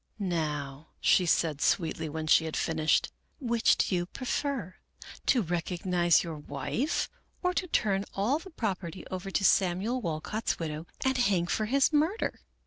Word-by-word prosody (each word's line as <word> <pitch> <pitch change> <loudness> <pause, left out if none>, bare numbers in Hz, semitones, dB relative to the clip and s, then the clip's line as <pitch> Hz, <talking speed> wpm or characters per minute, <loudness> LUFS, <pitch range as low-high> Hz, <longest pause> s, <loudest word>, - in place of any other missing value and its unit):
" - - -44
' - - -45 0.2
Now,' 150 -1 -4
she 180 - +4
said, 160 -3 +1
sweetly, 160 -2 +1
when 160 +1 -4
she 160 +1 +5
had 160 - -3
finished, 160 -1 +1 0.2
* - - -45
which 235 -4 +3
do - - +1
you 175 0 -1
prefer, 255 - -3 0.5
to 250 - +4
recognize 175 0 +1
your 165 -3 -5
wife, 145 - -2 0.4
or 360 0 +2
to 365 - -1
turn 200 - +1
all 230 +10 +1
the 380 - -11
property 195 - -4
over 185 +1 -4
to 195 - 0
Samuel 195 +8 +2
Walcott's 175 +5 -2
widow 155 0 -5 0.2
and 265 -1 +2
hang 195 -8 +2
for 215 +4 0
his 275 +5 +3
murder? 320 +9 +1
185 Hz, 165 wpm, -29 LUFS, 160-240 Hz, 0.5 s, she